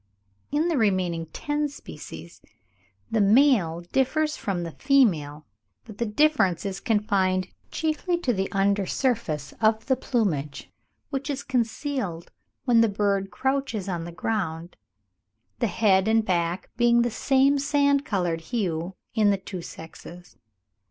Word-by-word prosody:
In 300 +4 +1
the 325 -6 +1
remaining 180 -6 +1
ten 295 - -2
species, 85 - -11 0.7
the 220 - +2
male 205 - +4
differs 305 +4 +1
from 185 -4 -3
the 165 - -5
female; 160 - +2 0.4
but 205 - -12
the 235 - 0
difference 210 - +2
is 195 -1 -3
confined 190 -4 +1 0.2
chiefly 320 +3 -1
to 250 -7 +1
the 190 -2 -2
under 200 0 +1
surface 205 - -1
of 220 0 +2
the 265 - +2
plumage, 175 - -2 0.4
which 275 0 -3
is 280 0 -3
concealed 235 - -2 0.3
when 240 -3 +5
the 230 - +4
bird 200 -1 0
crouches 265 -5 -2
on 175 -3 -3
the 170 - -7
ground; 175 -3 -3 0.8
the 235 - +2
head 195 -2 +3
and 220 0 +3
back 175 -2 -1
being 240 0 +4
of 235 - +5
the 240 - -1
same 275 +4 +3
sand 280 0 +2
coloured 175 - -1
hue 175 -2 -3 0.2
in 215 -2 +3
the 200 - +2
two 190 -1 -7
sexes. 170 +2 -11
210 Hz, 140 wpm, -25 LUFS, 180-265 Hz, 0.8 s, when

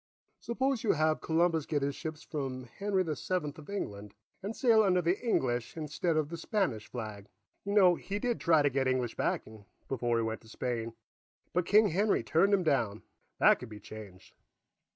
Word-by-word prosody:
Suppose 260 +1 -1
you 220 - +3
have 155 0 +1
Columbus 165 -1 +1
get 145 -3 0
his 140 0 0
ships 160 -2 -6
from 135 -4 -4
Henry 190 - -1
the 155 -3 -2
Seventh 155 -5 -3
of 155 - -13
England 105 - -5 0.3
and 205 +4 -4
sail 230 -4 +5
under 185 -3 +3
the 175 +2 +1
English 125 - 0
instead 155 +2 -1
of 150 -2 0
the 170 - -5
Spanish 165 - -1
flag. 105 -4 -7 0.3
You 200 - -3
know, 190 -4 +6
he 195 +4 -4
did 240 +2 -1
try 160 -3 +4
to 145 - +2
get 130 0 +1
English 130 -2 0
backing, 110 -2 -3 0.2
before 120 -3 0
he 115 - +1
went 110 0 -3
to 110 - -17
Spain, 115 -1 -3 0.6
but 180 0 0
King 210 +1 +6
Henry 200 +5 +2
turned 185 +5 +3
him 195 -2 +3
down. 120 -9 0 0.3
That - - +5
could - - -8
be 105 -1 -9
changed." 100 -5 -11
155 Hz, 190 wpm, -31 LUFS, 120-190 Hz, 0.6 s, know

